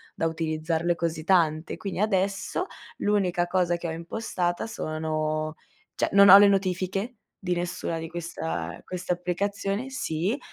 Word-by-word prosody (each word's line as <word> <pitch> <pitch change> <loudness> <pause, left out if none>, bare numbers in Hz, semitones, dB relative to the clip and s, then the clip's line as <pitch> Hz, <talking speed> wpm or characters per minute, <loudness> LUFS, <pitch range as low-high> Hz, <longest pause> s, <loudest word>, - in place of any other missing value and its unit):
da 165 - 0
utilizzarle 160 +1 -1
così 165 -2 -2
tante. 165 -4 +2
Quindi 195 -3 -5
adesso, 195 - 0 0.3
l'unica 190 -4 +1
cosa 175 -1 +1
che 170 0 -5
ho - - -2
impostata 175 +2 -2
sono 155 -3 -2 0.4
cioè, - - 0
non 200 0 +8
ho 195 - +12
le 205 - +8
notifiche, 195 +3 0 0.3
di 180 -1 0
nessuna 175 -1 -3
di 165 0 -5
questa 160 - -4
queste 180 0 -2
applicazioni 195 +6 -2
sì, 200 - -2
175 Hz, 135 wpm, -26 LUFS, 160-195 Hz, 0.4 s, ho